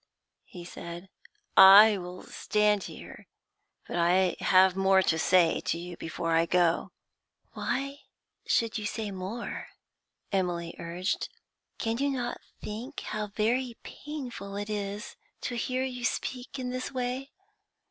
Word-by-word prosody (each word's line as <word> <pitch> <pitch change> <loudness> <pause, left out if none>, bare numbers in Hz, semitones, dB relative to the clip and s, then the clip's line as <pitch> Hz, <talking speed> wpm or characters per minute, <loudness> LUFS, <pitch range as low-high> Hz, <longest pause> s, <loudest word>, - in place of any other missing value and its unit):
he 175 -1 -10
said. 175 +1 -8 0.5
'I 200 +2 +10
will 180 0 -8
stand 210 -1 +1
here, - - -10 0.6
but - - -4
I 180 +1 +3
have 185 0 +5
more 190 0 +4
to 160 -2 +1
say 170 0 +4
to - - 0
you 175 +1 -7
before 165 0 -4
I 165 +1 +3
go.' 175 -1 +2 0.6
'Why 275 +1 -2 0.5
should 230 -1 +1
you 210 - -3
say 215 -1 -4
more?' 195 +5 -5 0.6
Emily 175 -3 -1
urged. 175 +3 -2 0.5
'Can 225 +1 -1
you 280 +1 +2
not 245 -3 -3 0.2
think 220 +5 -6
how 215 0 -3
very 230 +4 0
painful 250 -9 -7
it 205 +1 -4
is 205 0 -4 0.2
to 245 - -3
hear 255 +2 -1
you 250 -2 -4
speak 250 +3 -3
in 250 -1 -3
this 255 0 -4
way? 255 +1 -3
205 Hz, 135 wpm, -29 LUFS, 180-245 Hz, 0.6 s, I